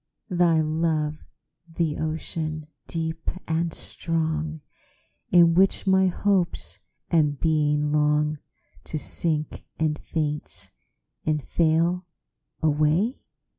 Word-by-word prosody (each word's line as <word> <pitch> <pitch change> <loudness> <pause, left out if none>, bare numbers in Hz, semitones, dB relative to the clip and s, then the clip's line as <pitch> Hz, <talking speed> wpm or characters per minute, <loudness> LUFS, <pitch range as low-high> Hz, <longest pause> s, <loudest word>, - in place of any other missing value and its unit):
Thy 175 -2 +4
love 155 -1 0 0.5
the 165 -2 -1
ocean, 155 0 -3 0.2
deep 160 -1 -3 0.2
and 165 +1 0
strong, 160 -1 -2 0.7
In 170 -1 +6
which 190 +3 +3
my 190 0 +4
hopes 185 -1 0 0.3
and 150 -4 +3
being 150 -2 +2
longTo 150 +1 -1
sink 155 0 -2
and 155 -2 0
faint 150 -2 -4 0.5
and 150 -2 0
fail 170 +4 +1 0.6
away? 155 - +2
160 Hz, 90 wpm, -25 LUFS, 150-170 Hz, 0.7 s, In